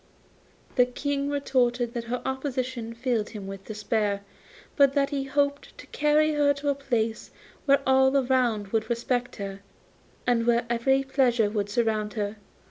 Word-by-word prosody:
The 250 -1 +5
King 280 +2 -2
retorted 245 -4 +1
that 235 -2 -4
her 245 +1 -3
opposition 255 -3 -3
filled 235 -3 -1
him 210 -3 -8
with 195 0 -8
despair, 210 -1 -1 0.5
but 280 -2 +5
that 280 0 +1
he 275 -1 -1
hoped 285 +1 -1
to - - -11
carry 300 +1 +2
her 290 -1 +3
to 285 +1 -2
a - - +3
place 235 -5 -2 0.4
where 275 -1 +4
all 265 +1 +4
around 245 -6 +1
would 220 +1 -1
respect 245 +1 -1
her, 195 -1 -6 0.7
and 235 -1 +2
where 235 0 +3
every 265 +3 +2
pleasure 245 -6 +2
would 205 -2 -1
surround 215 -1 0
her. 210 -1 -3
245 Hz, 155 wpm, -26 LUFS, 220-275 Hz, 0.7 s, The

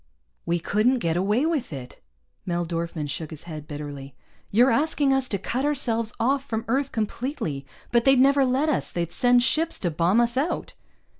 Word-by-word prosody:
"We 170 - +2
couldn't 215 +9 +2
get 165 -8 -1
away 205 - +1
with 310 - -1
it!" 130 -4 -8 0.4
Mel 175 -1 -2
Dorfman 165 -2 -3
shook 155 +2 -5
his 155 -1 -9
head 155 -3 -8
bitterly. 145 -2 -7 0.3
"You're 245 +6 +4
asking 285 +2 +2
us 270 -1 0
to 200 - 0
cut 245 +7 -3
ourselves 235 -6 0
off 270 +4 +1
from 225 -4 -4
Earth 270 +4 0
completely. 215 - -3 0.2
But 235 -1 +3
they'd 270 -1 +6
never 275 +1 +5
let 265 +4 +1
us. 305 - 0
They'd 170 -1 -3
send 245 -1 +4
ships 320 +5 +1
to 175 - -2
bomb 170 +7 +2
us 240 +1 +1
out." 300 +6 -1
230 Hz, 180 wpm, -25 LUFS, 170-265 Hz, 0.4 s, they'd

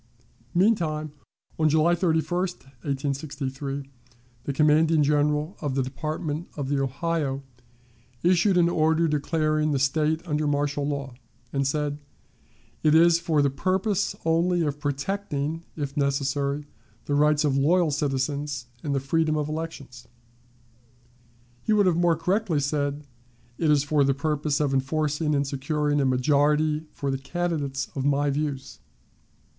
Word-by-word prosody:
Meantime, 165 -6 +1 0.5
on 155 -1 +4
July 160 +3 +3
31, 165 -2 +2 0.6
1863, 140 0 -3 0.6
the - - -1
commanding 155 +2 +4
General 150 +4 +1
of 145 -4 -2
the 135 - +1
Department 155 +4 -4
of 140 -2 -3
the 140 -1 +1
Ohio 140 0 -2 0.8
issued 180 +2 +4
an 170 -1 +5
order 160 0 +2
declaring 155 0 0
the 140 - +1
State 155 +5 0
under 150 -1 0
martial 145 0 0
law, 140 -3 -3 0.4
and 140 -1 +1
said, 145 0 -1 0.8
"It 155 0 +4
is 170 +1 +6
for 160 -4 +1
the 140 - +2
purpose, 190 +7 0
only, 170 +2 +2
of 145 -1 -2
protecting, 150 +1 -3
if 145 -2 -4
necessary, 140 0 0 0.4
the 145 - -2
rights 150 +1 +3
of 140 -2 +1
loyal 160 +4 +3
citizens 140 -1 -2 0.2
and 145 -2 -2
the - - +2
freedom 155 +3 +1
of 150 -1 -1
elections." 155 -6 -6 1.5
He 220 - +1
would 205 -1 +4
have 180 -3 +3
more 170 -1 +3
correctly 180 0 0
said, 145 0 -1 0.5
"It 160 - +2
is 145 -2 +4
for 145 0 +2
the 135 -1 +2
purpose 150 0 -1
of 145 -2 +1
enforcing 150 +3 0
and 140 0 +1
securing 145 +2 0
a - - +2
majority 150 +4 +2
for 140 -1 -3
the 135 - -2
candidates 145 -3 -2
of 135 - -3
my 145 +1 +2
views." 140 -2 -3
150 Hz, 140 wpm, -25 LUFS, 140-160 Hz, 1.5 s, is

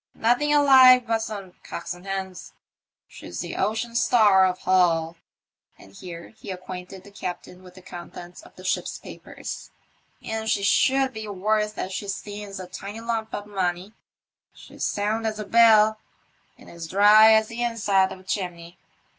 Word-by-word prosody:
Nothing 245 +6 +1
alive 260 -4 +7
but 225 -1 0
some 200 -4 -7
cocks 170 - -6
and 175 +2 -14
hens. 190 -1 -6 0.5
She's - - -10
the - - -6
Ocean 225 +2 -2
Star, 210 -5 +4
of 180 0 -2
Hull," 170 -3 +1 0.6
and 95 - -17
here 170 - -10
he 220 - -13
acquainted 185 0 -8
the 200 - -15
captain 180 -1 -7
with 180 -1 -16
the 185 - -15
contents 175 - -10
of 350 - -18
the - - -13
ship's - - -2
papers, - - -9 0.3
'* - - -38
and 220 0 -4
she 200 - 0
should 265 +5 +2
be 220 -1 -7
worth 210 +2 -1
as 190 - -4
she 200 - -5
stands 205 0 -7
a 185 - -7
tidy 195 +4 -8
lump 225 -1 -3
of 205 - -6
money. 190 0 -3 0.6
She's - - -10
sound 215 +2 -1
as 215 -1 -3
a 215 - -5
bell, 220 -1 +5 0.6
and - - -17
as 170 -1 -9
dry 210 +4 +6
as 220 0 +3
the 230 +1 -6
inside 210 -5 +1
of 185 - -9
a - - -20
chimney." 175 -3 -5
205 Hz, 170 wpm, -24 LUFS, 185-220 Hz, 0.6 s, alive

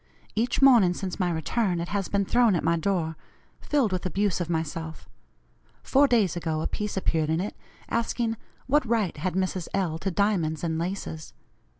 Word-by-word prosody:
Each 235 +5 0
morning 225 -10 +6
since 190 +1 -5
my 180 -2 +1
return 175 +3 0
it 170 - -4
has 200 -2 -1
been 200 -1 0
thrown 235 -2 +3
at 170 - -1
my 165 +1 +3
door, 165 -2 -1 0.4
filled 275 -8 +1
with 185 -1 -2
abuse 195 0 0
of 175 - -3
myself. 160 -1 -4 0.8
Four 280 +1 +4
days 220 -9 +2
ago 160 -2 -2
a - - -1
piece 210 -1 -4
appeared 160 -4 0
in 160 +1 +1
it, 200 +4 -3 0.3
asking 230 0 -1 0.3
'What 295 +3 +3
right 225 -6 0
had 180 +4 -2
Mrs. 185 -2 -1
L. 170 -5 -1
to 195 - -2
diamonds 170 -5 0
and 160 -1 -1
laces?' 170 -3 -5
185 Hz, 180 wpm, -26 LUFS, 165-215 Hz, 0.8 s, morning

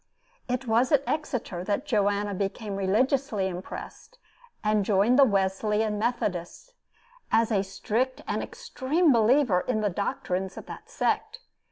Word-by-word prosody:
It 250 +1 -1
was 235 +4 +2
at 285 -2 +4
Exeter 250 - -3
that 210 +8 -1
Joanna 205 -4 +1
became 200 +2 -3
religiously 215 +2 +1
impressed, 190 - -8 0.5
and 210 -1 +2
joined 210 +6 +3
the - - +9
Wesleyan 210 0 +1
Methodists, 215 - -3 0.6
as 225 0 +3
a 200 -3 +3
strict 230 +7 -2
and - - -1
extreme 345 - 0
believer 230 -4 +4
in 220 -1 -1
the 205 -2 0
doctrines 190 -2 -3
of - - -8
that 435 - -10
sect. 475 -1 -1
215 Hz, 135 wpm, -27 LUFS, 195-260 Hz, 0.6 s, the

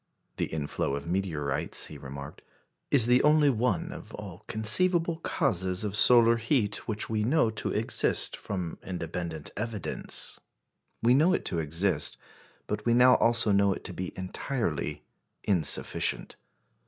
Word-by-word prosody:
The - - -1
inflow 75 -2 -3
of 70 0 -6
meteorites, 80 -7 -2
he - - -10
remarked, 70 +2 -9 0.5
"is 130 -6 +5
the 125 +1 +4
only 150 -1 +4
one 115 -7 -1
of - - -10
all 100 -1 -10
conceivable 165 - +3
causes 95 - -1
of 105 -1 -3
solar 115 +1 +6
heat 115 -3 -1
which 105 -1 0
we 110 -1 -2
know 125 -1 +2
to 110 - -3
exist - - +1
from 90 -5 -5
independent 85 -3 -5
evidence." 110 -2 -2 0.6
We 120 +2 +5
know 160 +8 +4
it - - -2
to 85 - -2
exist, 80 -1 0 0.5
but - - -4
we 120 0 +2
now 125 +1 +6
also 115 -2 +3
know 100 0 +3
it - - -9
to - - -6
be 90 0 -5
entirely 90 - -4 0.4
insufficient. 90 -6 0
105 Hz, 140 wpm, -28 LUFS, 85-120 Hz, 0.6 s, solar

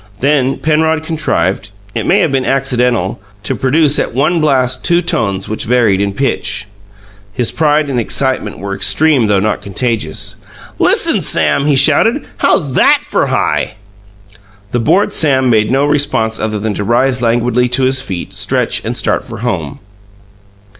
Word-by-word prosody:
Then 135 -1 +1
Penrod 160 0 0
contrived 105 - -2 0.2
it - - -3
may - - +3
have 155 - +1
been 135 -1 0
accidental 125 -8 0 0.2
to - - -2
produce 150 +2 +2
at - - -3
one 155 +5 +1
blast 130 -4 +1
two 175 0 +2
tones 100 - -2
which 110 - -4
varied 115 -5 +2
in 100 0 0
pitch. 110 -6 -2 0.7
His 120 +2 -1
pride 150 -1 +1
and 130 -3 -1
excitement 130 -2 -1
were 100 +1 -5
extreme 135 +4 +2
though 100 -2 +2
not 105 +2 -1
contagious. 105 -6 -3 0.4
"Listen, - - +2
Sam!" 140 - +2
he 145 - +3
shouted. 155 - +3
"How's 145 -8 +1
THAT - - +4
for - - 0
high?" - - -1 1.0
The 120 - 0
bored 195 - +1
Sam 130 -5 +2
made 110 -2 +2
no 135 +2 +2
response 140 -7 +1
other 110 -1 -2
than 105 +1 -3
to 100 - -3
rise 125 +4 +1
languidly 120 +1 +1
to 130 +2 0
his 130 +1 +1
feet, 95 -9 -6
stretch, - - -1
and - - -4
start - - -1
for - - -9
home. 85 -11 -3
130 Hz, 160 wpm, -13 LUFS, 110-145 Hz, 1.0 s, THAT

